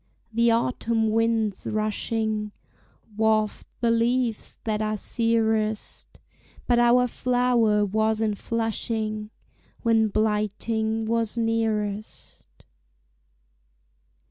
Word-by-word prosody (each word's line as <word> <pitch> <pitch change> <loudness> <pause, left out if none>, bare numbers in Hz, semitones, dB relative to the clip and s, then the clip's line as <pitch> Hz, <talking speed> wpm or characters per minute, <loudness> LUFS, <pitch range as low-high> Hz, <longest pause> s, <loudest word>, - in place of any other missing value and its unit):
The 235 +1 +3
autumn 230 -1 +1
winds 225 -2 0
rushing 215 0 -1 0.6
Waft 220 -1 +1
the 235 -1 +3
leaves 230 0 0
that 215 -1 -1
are 215 0 -1
searest, 220 -1 -1 0.5
But 240 -1 +3
our 240 +1 +5
flower 245 -4 +2
was 220 +2 +1
in 220 -1 +1
flushing 220 -1 -2 0.5
When 225 -2 +3
blighting 220 +1 -1
was 230 0 -1
nearest. 220 -2 -2
220 Hz, 85 wpm, -25 LUFS, 215-230 Hz, 0.6 s, our